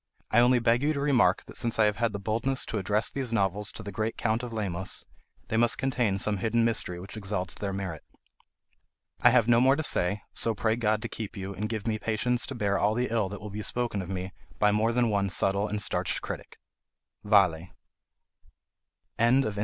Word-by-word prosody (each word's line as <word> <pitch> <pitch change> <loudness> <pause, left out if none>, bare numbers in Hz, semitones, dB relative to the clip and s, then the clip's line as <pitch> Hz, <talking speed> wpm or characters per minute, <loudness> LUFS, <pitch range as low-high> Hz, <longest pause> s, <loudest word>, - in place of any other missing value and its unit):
I 110 - +5
only 125 +1 +5
beg 120 +1 +2
you 150 +2 +2
to 140 - -3
remark 140 -3 +3
that - - -9
since 115 -1 0
I 110 - +5
have 105 -1 +1
had 115 -1 +1
the 100 - -4
boldness 115 +6 -1
to 110 - -3
address 105 +4 0
these 130 -4 -3
novels 100 -1 0
to 110 - -8
the 100 - -6
great 110 +3 -2
Count 110 +1 0
of 125 -1 -6
Lemos, 95 -4 -4 0.4
they 110 - 0
must 120 0 +2
contain 125 -7 0
some 105 +1 0
hidden 115 +3 +1
mystery 105 -6 -1
which 95 +4 -9
exalts 95 -4 -3
their 100 -1 -4
merit. 95 -5 -5 1.2
I 120 - +7
have 120 -2 +4
no 120 0 +5
more 135 +2 +5
to 160 - -2
say, 100 - 0
so 115 -1 0
pray 110 +2 +1
God 110 -2 0
to - - -2
keep 110 -3 -7
you, 95 +1 -5
and 105 +2 -4
give 110 -3 -4
me 110 -1 -1
patience 120 +3 0
to 135 - -6
bear 100 -3 0
all 105 +1 +2
the 125 +1 0
ill 110 -4 +1
that 100 - -7
will 105 -1 -7
be 105 +2 -5
spoken 120 -2 -1
of 95 - -7
me 95 0 -4 0.2
by 105 0 +4
more 110 +2 +2
than 120 -1 +1
one 100 -1 +1
subtle 100 +2 +2
and 105 0 -3
starched - - 0
critic. - - -7 0.7
Vale. 95 -5 +3 1.5
CONTENTS. 115 -3 +3
110 Hz, 215 wpm, -28 LUFS, 100-120 Hz, 1.5 s, I